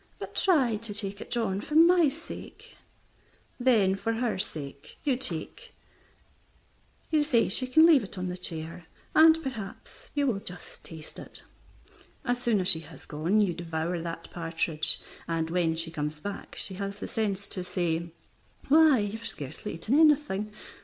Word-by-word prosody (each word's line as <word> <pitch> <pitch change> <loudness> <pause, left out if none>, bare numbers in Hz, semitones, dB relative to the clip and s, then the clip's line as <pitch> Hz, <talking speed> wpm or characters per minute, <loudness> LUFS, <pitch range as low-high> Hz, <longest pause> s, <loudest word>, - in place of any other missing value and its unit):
"But - - -7
try 265 - +4
to 220 -1 -3
take 200 -1 -3
it, - - -8
John, 210 -5 0
for 300 - -5
my 335 -1 +7
sake." 325 +4 -10 0.8
Then 225 -7 +4
for 225 +4 -1
her 225 -4 -1
sake 140 -8 -6
you 265 -4 +1 2.0
say 250 -6 +2
she 255 +7 +2
can 315 +5 +6
leave 310 -8 +6
it 200 - -9
on 185 - -3
the 180 - -3
chair, 165 -2 -6 0.3
and 320 +1 +7
perhaps 255 - -7
you 290 -1 +2
will 230 -7 +1
just 180 -3 -10
taste 160 -2 -10
it. - - -7 0.8
As 245 0 0
soon 235 -4 +2
as 180 - -2
she 165 -4 +6
has 160 - -13
gone 170 +8 +1
you 190 -4 +2
devour 170 0 -3
that 165 0 -6
partridge, 165 -2 -1 0.3
and 165 -1 -1
when 170 -2 +1
she 165 0 0
comes 150 -1 -3
back 200 +5 -7
she 190 - -3
has 200 0 -4
the - - -6
sense 200 -3 -1
to 185 - -3
say 170 -2 -2 0.6
"Why, 310 -1 +7
you 205 +1 -2
have 230 - -5
scarcely 140 +1 -4
eaten 220 - +1
anything. 295 -10 +3
200 Hz, 160 wpm, -28 LUFS, 170-250 Hz, 2.0 s, my